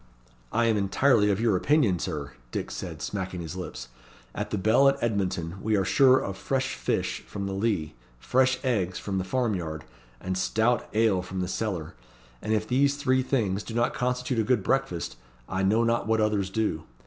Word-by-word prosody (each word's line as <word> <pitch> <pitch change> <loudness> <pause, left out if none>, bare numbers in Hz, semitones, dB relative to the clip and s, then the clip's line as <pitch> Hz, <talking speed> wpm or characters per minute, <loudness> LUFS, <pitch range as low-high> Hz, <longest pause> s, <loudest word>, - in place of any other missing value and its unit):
"I 120 +1 +2
am 115 -2 +3
entirely 105 +2 +3
of 100 0 +1
your 115 -3 +2
opinion, 110 - +2
Sir," 75 -6 -4 0.2
Dick - - -3
said, - - -6
smacking 95 -3 -4
his 80 +1 -6
lips. 65 -9 -7 0.4
"At - - -4
the 105 - -1
Bell 110 +8 +5
at 135 - 0
Edmonton 95 -6 -2
we 110 0 +1
are 95 - +1
sure 130 +3 +5
of 95 -6 -3
fresh 130 -1 -1
fish - - -1
from 100 -1 -5
the 100 - -3
Lea, 95 -7 -1 0.2
fresh 130 - +2
eggs 95 -8 0
from 95 -2 -3
the - - -1
farm 120 +3 0
yard, 80 -4 -4 0.4
and 95 0 -3
stout 110 +5 +1
ale 110 -4 +3
from 95 +1 -6
the 90 - -1
cellar; 95 -4 -3 0.5
and 110 - -3
if 110 0 +1
these 140 +3 +3
three 130 -2 +2
things 110 -7 0
do 115 - -7
not 120 0 +1
constitute 125 0 -1
a - - +3
good 120 -3 +1
breakfast, 130 - -1 0.3
I 95 0 -2
know 105 +4 +3
not 115 0 +1
what 110 0 +2
others 105 -3 +1
do. 95 -7 -1
105 Hz, 195 wpm, -27 LUFS, 95-120 Hz, 0.5 s, Bell